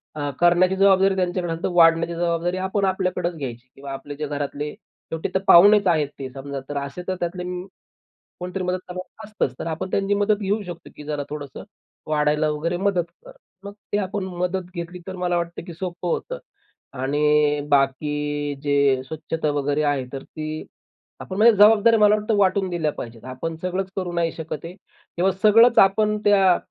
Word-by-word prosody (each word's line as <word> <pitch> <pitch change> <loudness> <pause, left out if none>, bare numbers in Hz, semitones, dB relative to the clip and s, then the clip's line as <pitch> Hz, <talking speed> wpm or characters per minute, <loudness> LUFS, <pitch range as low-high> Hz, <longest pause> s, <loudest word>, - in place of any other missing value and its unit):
अ, 145 -1 -3
करण्याची 175 +2 +4
जबाबदारी 195 0 +4
त्यांच्याकडे 180 -2 -1
असेल 165 - -8
तर - - +1
वाढण्याची 165 0 +4
जबाबदारी 170 +1 -1
आपण 190 +1 -1
आपल्याकडच 185 -2 -1
घ्यायची 125 -3 -7
किंवा 140 0 -9
आपले 140 +2 -7
जे 150 0 -4
घरातले 145 +1 -4
शेवटी 160 0 -7
तर - - +4
पाहुणेच 205 +3 +7
आहेत 155 -4 +2
ते 135 -1 -5
समजा 140 +1 -6
तर 145 - -3
असे 140 +5 -5
तर 185 - -1
त्यातले 180 +1 -3 1.0
कोणीतरी 180 +1 -4
मदत 180 0 -1
करणार 185 +4 -8
असतच. 205 -11 -2
तर - - -4
आपण 165 +4 -4
त्यांची 200 +1 +1
मदत 205 +1 +2
घेऊ 205 +2 0
शकतो, 175 -2 -9
की 150 - -10
जरा 150 -1 -3
थोडंसं 145 -3 -7 0.5
वाढायला 150 0 +1
वगैरे 160 +4 -2
मदत 185 -2 +1 0.2
कर. - - -11 0.3
मग 200 - -7 0.2
ते 205 - +2
आपण 195 0 -2
मदत 180 0 -2
घेतली 175 +1 -6
तर 185 -1 -6
मला 180 -1 0
वाटतं, 170 0 -3
की 170 -1 -9
सोपं 175 0 -5
होतं. - - -3 0.5
आणि 150 +2 +2
बाकी 145 +1 0
जे 140 -2 +2
स्वच्छता 160 0 -3
वगैरे 145 +1 0
आहे 145 -3 0
तर 135 -1 -5
ती 155 0 -6 0.6
आपण 190 - -6
म्हणजे 225 +3 +6
जबाबदाऱ्या 220 +2 +6
मला 210 0 +6
वाटतं 215 +1 0
वाटून 195 -1 +2
दिल्या 160 -4 -1
पाहिजेत. 115 -4 -9
आपण 130 +6 -5
सगळंच 185 +1 -2
करू 185 -2 -3
नाही 170 -1 0
शकत 160 -2 -6
आहे. 170 +2 -7
तेव्हा 190 -1 -3
सगळंच 230 +3 +6
आपण 210 +2 +4
त्या 195 -3 +5
175 Hz, 180 wpm, -23 LUFS, 150-190 Hz, 1.0 s, पाहुणेच